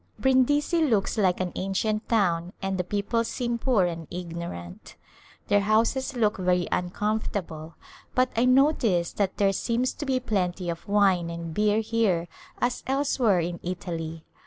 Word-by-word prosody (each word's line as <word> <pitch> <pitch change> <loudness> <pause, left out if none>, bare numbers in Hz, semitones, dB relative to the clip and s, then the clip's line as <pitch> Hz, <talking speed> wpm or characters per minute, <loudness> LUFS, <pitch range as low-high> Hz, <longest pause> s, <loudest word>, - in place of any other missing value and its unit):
Brindisi 290 +5 +2
looks 220 -10 +1
like 190 -5 +2
an 185 -1 -2
ancient 215 +3 -2
town 180 -5 +1
and 190 -1 -2
the - - +1
people 205 +5 -1
seem 235 0 -2
poor 230 -7 +2
and 165 -2 -4
ignorant. 170 - -7 0.5
Their 205 - +4
houses 225 +6 +1
look 220 -3 +1
very 180 -1 +1
uncomfortable, 180 -4 -2 0.4
but 255 0 +3
I 235 +2 +3
notice 255 - +3
that 195 -2 -1
there 195 -1 +3
seems 240 +5 0
to 290 - -6
be 260 -1 +1
plenty 185 -6 -1
of 165 - -9
wine 195 -4 +3
and 170 -1 -6
beer 210 +3 +2
here 210 -7 0 0.3
as 245 0 0
elsewhere 260 -8 +2
in 170 +1 -4
Italy. 165 -3 -5
200 Hz, 150 wpm, -26 LUFS, 175-235 Hz, 0.5 s, Their